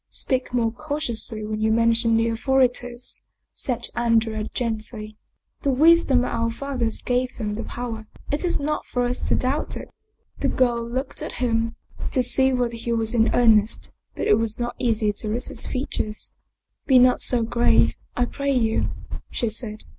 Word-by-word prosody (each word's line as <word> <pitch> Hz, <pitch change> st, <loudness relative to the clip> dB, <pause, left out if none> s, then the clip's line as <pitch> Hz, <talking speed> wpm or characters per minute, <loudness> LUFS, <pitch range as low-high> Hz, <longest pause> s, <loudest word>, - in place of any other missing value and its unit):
" -, -, -57 dB, 0.2 s
Speak 260 Hz, -1 st, -1 dB
more 235 Hz, -2 st, +1 dB
cautiously 240 Hz, -6 st, -2 dB
when 215 Hz, 0 st, -3 dB
you 220 Hz, 0 st, +2 dB
mention 230 Hz, 0 st, +3 dB
the 225 Hz, -, +2 dB
authori 250 Hz, +2 st, +2 dB
ties," 245 Hz, 0 st, -4 dB, 0.3 s
said 240 Hz, -2 st, -1 dB
Andrea 225 Hz, -2 st, +1 dB
gently. 215 Hz, -2 st, -4 dB, 0.3 s
" -, -, -51 dB
The 280 Hz, -, 0 dB
wisdom 275 Hz, -2 st, +4 dB
of -, -, -3 dB
our 230 Hz, 0 st, 0 dB
fathers 245 Hz, -2 st, -2 dB
gave 250 Hz, 0 st, -1 dB
them 210 Hz, -3 st, -3 dB
the 220 Hz, -, -4 dB
power, 225 Hz, -3 st, -6 dB, 0.2 s
it 290 Hz, -, -1 dB
is 355 Hz, -, 0 dB
not 300 Hz, +1 st, -2 dB
for 245 Hz, -, -1 dB
us 245 Hz, +1 st, -1 dB
to -, -, 0 dB
doubt 265 Hz, +4 st, -1 dB
it." -, -, -9 dB, 0.5 s
The -, -, 0 dB
girl 240 Hz, -2 st, +1 dB
looked 260 Hz, +3 st, -3 dB
at -, -, -5 dB
him 230 Hz, -2 st, -1 dB, 0.4 s
to 255 Hz, -, +3 dB
see 265 Hz, +2 st, +5 dB
whether 245 Hz, -2 st, 0 dB
he 235 Hz, +1 st, -4 dB
was 225 Hz, 0 st, 0 dB
in 225 Hz, -1 st, +3 dB
earnest, 220 Hz, -3 st, +3 dB, 0.2 s
but -, -, -3 dB
it 210 Hz, -, +4 dB
was 225 Hz, 0 st, 0 dB
not 240 Hz, 0 st, -3 dB
easy 220 Hz, -4 st, +1 dB
to 215 Hz, +1 st, -4 dB
read 235 Hz, +4 st, -1 dB
his -, -, -2 dB
features. 215 Hz, -5 st, -3 dB, 0.3 s
" -, -, -56 dB
Be 265 Hz, -, +6 dB
not 250 Hz, 0 st, +5 dB
so 240 Hz, -2 st, +3 dB
grave, 235 Hz, +1 st, +3 dB, 0.2 s
I 245 Hz, -, +3 dB
pray 280 Hz, +3 st, -2 dB
you," 225 Hz, -3 st, +1 dB, 0.4 s
she 235 Hz, -, -1 dB
said. 215 Hz, -1 st, -4 dB
240 Hz, 185 wpm, -23 LUFS, 225-255 Hz, 0.5 s, Be